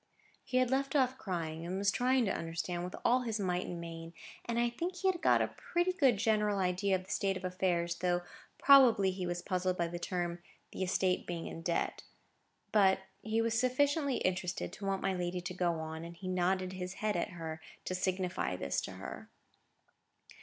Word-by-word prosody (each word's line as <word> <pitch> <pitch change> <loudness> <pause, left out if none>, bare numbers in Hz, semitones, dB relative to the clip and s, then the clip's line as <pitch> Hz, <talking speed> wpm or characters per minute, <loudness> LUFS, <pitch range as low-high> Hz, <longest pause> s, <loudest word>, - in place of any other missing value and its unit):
He 255 - -1
had 255 -1 +3
left 275 +2 0
off 260 -2 +2
crying, 165 -4 -3
and 180 +2 -3
was 200 0 +2
trying 250 +2 +2
to 195 - 0
understand, 165 +1 -3
with 180 - -5
all 250 +2 +4
his 225 -3 -2
might 180 -2 -1
and 175 - -5
main; 165 0 -7 0.3
and 235 0 -2
I 240 0 +3
think 340 +10 -3
he 380 +1 -1
had 355 -2 -8
got - - +5
a - - -2
pretty 350 +1 0
good 270 - +4
general 210 -1 +2
idea 190 +1 +1
of 185 - -3
the 190 - -10
state 195 -2 +1
of 185 - -7
affairs; 175 -2 0
though 175 0 +1 0.3
probably 235 -9 +7
he 185 -1 -4
was 175 0 -3
puzzled 185 -1 0
by 170 - +1
the 175 +1 -5
term 175 -1 -2 0.3
"the - - -6
estate 185 0 +1
being 170 -1 -4
in 165 - -6
debt." 170 -1 -1 0.7
But 190 -3 +5 0.2
he 225 +1 0
was 230 -1 +1
sufficiently 280 +3 +2
interested 185 -1 -1
to 200 - -7
want 195 0 -1
my 195 - +1
lady 180 0 -2
to 180 +1 -5
go 175 -1 +1
on; 160 0 -5
and 170 0 -9
he 185 - -7
nodded 185 +1 +1
his 185 0 -5
head 215 -2 -1
at 175 +3 -1
her, 160 -2 -6 0.2
to - - -2
signify 185 - -1
this 70 -6 -1
to - - -6
her. - - -8
185 Hz, 205 wpm, -33 LUFS, 175-225 Hz, 0.7 s, probably